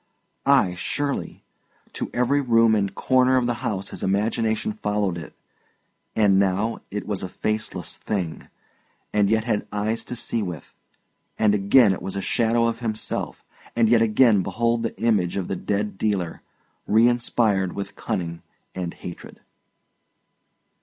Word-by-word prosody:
Ay, 135 -10 +4
surely; 140 +9 -3 0.5
to - - -4
every 125 +4 +2
room 115 -3 +4
and 100 -2 0
corner 130 0 +3
of 125 - +2
the 120 - +1
house 100 -6 -2
his - - -7
imagination 110 +2 0
followed 105 -3 -1
it; 80 -3 -9 0.8
and 100 -3 +4
now 100 +4 +1
it 105 +1 -4
was 105 -3 -2
a 95 - -4
faceless 110 +3 -2
thing, 90 -7 -4 0.7
and 105 -2 +3
yet 110 0 +2
had 110 -3 -1
eyes 110 +2 -1
to 125 - -6
see 115 -1 -1
with; 90 -7 -6 0.6
and 105 -2 +3
again 100 +2 +5
it - - -6
was 95 - -5
a - - -1
shadow 115 +2 +2
of 115 0 -1
himself; 110 -3 -4 0.3
and 115 -2 +3
yet 115 -1 +5
again 110 -2 +4
behold 115 +5 0
the 115 - -4
image 100 -6 +1
of 95 - -2
the - - -2
dead 105 +2 -2
dealer, 95 -6 -1 0.5
reinspired 110 -4 +3
with 100 - -6
cunning 85 -2 -3 0.3
and 90 -2 -4
hatred. 85 - -9
105 Hz, 145 wpm, -24 LUFS, 95-115 Hz, 0.8 s, again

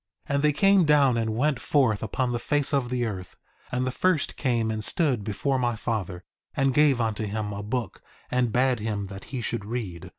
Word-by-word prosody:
1:11 - - -1
And 140 +1 +1
they 150 - +5
came 195 +4 +4
down 145 -5 +4
and 110 -1 -1
went 140 0 +1
forth 130 -8 +2
upon 125 +3 -1
the 120 - -1
face 145 +1 0
of 135 -3 +1
the 125 -1 0
earth; 95 -5 -6 0.3
and 125 +1 0
the 130 - -1
first 180 +2 +1
came 120 -4 0
and 110 -1 -3
stood 130 -4 +1
before 110 +7 -1
my 120 -2 0
father, 100 -6 -3 0.3
and 135 -1 +2
gave 145 -2 +4
unto 110 -2 -1
him 105 0 -3
a 100 - -5
book, 115 -1 -4 0.3
and 125 -2 +1
bade 125 +1 +2
him 105 -2 -3
that 95 0 -9
he 130 -3 -5
should 115 -2 -2
read. 105 -6 -5
120 Hz, 210 wpm, -26 LUFS, 110-135 Hz, 0.3 s, they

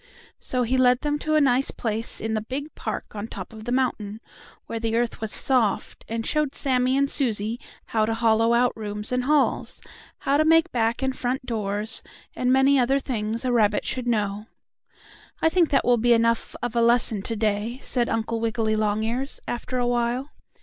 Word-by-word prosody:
So 250 -1 -1
he 255 +2 +1
led 250 0 +4
them 295 -1 -1
to 310 +1 0
a 305 - +5
nice 265 -1 +2
place 225 0 -3
in 220 0 -2
the 215 - 0
big 275 +7 -5
park - - -5
on 205 +1 -4
top 195 0 -8
of 220 0 -10
the 240 - -3
mountain, 225 -5 -1 0.5
where 230 - -4
the 225 0 -1
earth 235 -1 -1
was 220 -1 -2
soft, 245 -7 +1
and 225 0 -3
showed 300 -2 0
Sammie 255 -1 +1
and 280 0 +3
Susie 230 -5 -1 0.3
how 215 -1 0
to 225 - 0
hollow 225 0 +3
out 245 +1 +2
rooms 210 0 -5
and 250 0 0
halls, 295 0 +1 0.4
how 280 +1 +1
to 310 - +4
make 325 +2 +4
back 230 +1 0
and 265 -1 0
front 255 +1 -2
doors, 215 -1 -2 0.3
and 250 0 +1
many 270 +1 +5
other 260 +2 +3
things 230 -3 -3
a 250 - +1
rabbit 215 -3 +2
should 250 -1 -2
know. 210 -2 -1 0.9
"I 320 - +3
think 340 -1 +3
that 275 - +2
will 245 0 +4
be 240 +1 +4
enough 230 0 +1
of 245 -1 -2
a 235 - +3
lesson 230 -3 +2
to 225 - -2
day," 215 +2 -1
said 240 -2 0
Uncle 225 0 -1
Wiggily 225 -1 0
Longears, 220 +5 -1
after 250 +1 -3
a 245 - +1
while. 245 +3 -1
235 Hz, 195 wpm, -24 LUFS, 220-260 Hz, 0.9 s, a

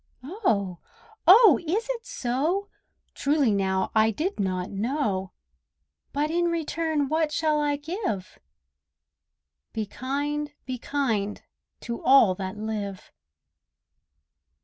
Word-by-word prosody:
Oh! 225 - -1 0.5
oh! 420 +3 +8
is 385 +9 -1
it 475 -1 -6
so? 310 +12 -1 0.4
Truly 280 -4 +2
now, 190 -1 0
I 220 0 +4
did 310 - -2
not 185 -2 -1
know! 205 -4 -1 0.8
But 295 +2 -1
in 345 +1 +1
return 320 -3 -1
what 310 +1 +1
shall 305 0 +1
I 290 -1 +1
give? 290 - -4 1.3
"Be 220 -1 -2
kind, 290 +6 -3
be 255 -1 -4
kind, 225 -8 -1 0.4
to 235 -1 -5
all 255 -7 +6
that 190 +2 -5
live." 210 -3 -5
275 Hz, 105 wpm, -26 LUFS, 210-315 Hz, 1.3 s, oh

